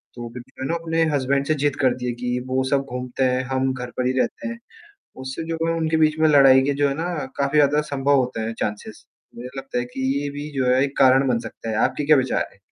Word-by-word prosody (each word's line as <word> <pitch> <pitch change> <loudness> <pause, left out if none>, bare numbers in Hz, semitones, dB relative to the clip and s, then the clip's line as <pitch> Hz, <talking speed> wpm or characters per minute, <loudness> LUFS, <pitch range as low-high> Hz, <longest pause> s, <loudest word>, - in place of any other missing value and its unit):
तो 120 -1 -6
फ़िर 120 +1 -9
वो - - -14
है - - -2
ना 165 - 0
अपने 165 -1 0
हसबैंड 140 0 0
से 155 - +3
जिद 145 -2 +1
करती 125 -1 +1
है - - 0
कि 125 0 -1
वो 130 0 0
सब 140 -1 +2
घूमते 125 +1 -3
हैं, 130 0 +1
हम 130 0 0
घर 125 -1 -6
पर 125 - 0
ही - - +2
रहते - - -2
हैं, 230 0 -6 0.6
उससे 130 +4 -5
जो 165 - -2
है 165 - +1
उनके 160 -1 0
बीच 155 0 +2
में 160 0 +4
लड़ाई 135 -3 +6
के 140 +2 +1
जो 145 0 +2
है 135 - -2
ना 165 +2 -3 0.3
काफ़ी 140 +1 +1
ज़्यादा 145 0 +4
संभव 140 +1 +2
होते 125 -3 -1
हैं 110 +1 -3
चांसेस, 105 0 -5 0.3
मुझे 120 +2 -7
लगता 135 -2 -4
है 120 - -1
कि - - -5 0.2
ये 145 - -3
भी 145 +1 -7
जो 130 - +1
है 130 +1 +4
एक 140 0 -5
कारण 135 +1 +5
बन 120 -2 +2
सकता 115 - -8
है, 110 - -2
आपके 150 - -4
क्या 155 0 +6
विचार 130 -1 0
है? - - -23
135 Hz, 265 wpm, -22 LUFS, 125-145 Hz, 0.6 s, लड़ाई